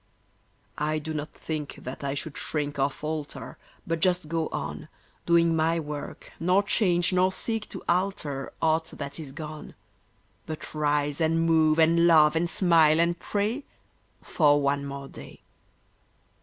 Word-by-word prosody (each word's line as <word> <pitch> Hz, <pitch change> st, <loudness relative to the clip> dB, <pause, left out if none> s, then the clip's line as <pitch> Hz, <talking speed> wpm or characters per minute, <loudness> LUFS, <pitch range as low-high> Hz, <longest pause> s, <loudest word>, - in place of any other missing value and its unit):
I 155 Hz, +1 st, 0 dB
do 155 Hz, +1 st, -5 dB
not 150 Hz, 0 st, -4 dB
think 155 Hz, -2 st, -5 dB
that 130 Hz, +3 st, -7 dB
I 140 Hz, 0 st, -2 dB
should 145 Hz, +1 st, -5 dB
shrink 145 Hz, -2 st, -3 dB
or 135 Hz, +1 st, +3 dB
falter, 150 Hz, +1 st, -6 dB, 0.3 s
But 165 Hz, 0 st, -1 dB
just 180 Hz, -1 st, +1 dB
go 165 Hz, 0 st, -1 dB
on, 75 Hz, 0 st, -5 dB, 0.4 s
Doing 170 Hz, -1 st, +4 dB
my 165 Hz, +1 st, +2 dB
work, 150 Hz, -2 st, -7 dB
nor 180 Hz, +4 st, +3 dB
change, 180 Hz, -3 st, +1 dB
nor 185 Hz, +1 st, +3 dB
seek 225 Hz, +2 st, -2 dB
to -, -, -8 dB
alter 170 Hz, -7 st, -1 dB
Aught 160 Hz, 0 st, +1 dB
that 140 Hz, +1 st, -6 dB
is 150 Hz, -4 st, -7 dB
gone; 155 Hz, +1 st, -8 dB, 0.7 s
But 155 Hz, -1 st, -7 dB
rise 145 Hz, -1 st, 0 dB
and 165 Hz, +1 st, +2 dB
move 160 Hz, -1 st, +4 dB
and 165 Hz, +1 st, +5 dB
love 155 Hz, -2 st, +6 dB
and 170 Hz, +1 st, +1 dB
smile 165 Hz, -3 st, +4 dB
and 170 Hz, 0 st, +1 dB
pray 215 Hz, +7 st, -1 dB, 0.6 s
For 145 Hz, -3 st, +3 dB
one 140 Hz, 0 st, 0 dB
more 140 Hz, 0 st, -6 dB
day. -, -, -12 dB
160 Hz, 150 wpm, -27 LUFS, 145-170 Hz, 0.7 s, love